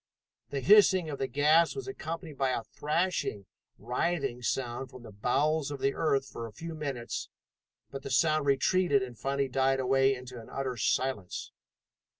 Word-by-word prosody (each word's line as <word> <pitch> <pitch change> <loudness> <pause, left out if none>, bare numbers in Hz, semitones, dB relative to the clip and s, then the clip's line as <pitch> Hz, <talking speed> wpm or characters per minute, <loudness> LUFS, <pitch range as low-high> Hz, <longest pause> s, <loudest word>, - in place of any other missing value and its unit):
The 140 -1 -3
hissing 190 0 +5
of 140 - -5
the 135 - 0
gas 150 +6 +4
was 405 - -5
accompanied 165 - -6
by 135 -1 +1
a 125 -3 -1
thrashing, 150 - -1 0.3
writhing 125 +2 -1
sound 125 +1 -2
from 125 -1 -12
the 115 - -10
bowels 140 +8 +1
of 145 -1 -5
the 135 +1 +1
earth 140 -4 +1
for 115 -2 -6
a - - -11
few 165 +9 -7
minutes, 140 -6 -4 0.6
but 135 - -6
the 140 - -7
sound 155 +2 +2
retreated 140 +1 +3
and 125 -2 -7
finally 135 +4 -1
died 135 +1 +1
away 135 +1 +3
into 125 -1 -9
an 110 - -14
utter 135 -2 -3
silence. 115 -3 -1
135 Hz, 165 wpm, -30 LUFS, 125-155 Hz, 0.6 s, hissing